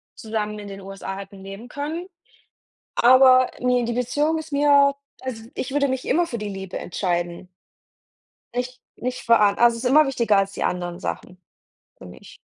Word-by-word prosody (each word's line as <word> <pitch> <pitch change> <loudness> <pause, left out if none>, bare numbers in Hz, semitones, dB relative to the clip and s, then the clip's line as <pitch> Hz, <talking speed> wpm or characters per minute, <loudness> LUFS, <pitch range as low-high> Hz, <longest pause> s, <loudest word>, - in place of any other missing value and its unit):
zusammen 210 -1 -4
in 205 - -8
den 195 0 -8
USA 195 0 -7
hätten 195 0 -10
Leben 195 +5 -9
können, 310 +6 -4 0.9
aber 255 +1 +6
ne 250 -1 +2
die 235 0 -2
Beziehung 290 +6 0
ist 315 -1 -9
mir 280 -1 +5 0.3
also, 245 -4 -6
ich 260 - -4
würde 280 0 +2
mich 260 -1 -3
immer 345 +1 +2
für 240 -8 -5
die 210 -1 -4
Liebe 190 -2 -6
entscheiden. 175 -1 -3 1.0
Nicht 250 +1 -4 0.2
nicht 250 +1 -4
vor 230 0 +5
a 205 -1 +4
also, 235 0 +4
es 230 - -7
ist 250 - +1
immer 305 +3 +6
wichtiger 235 -6 +2
als 195 0 +1
die - - -3
anderen 175 -1 -2
Sachen 180 -1 -6 0.6
für 95 - -12
mich. 90 - -13
235 Hz, 180 wpm, -23 LUFS, 195-260 Hz, 1.0 s, aber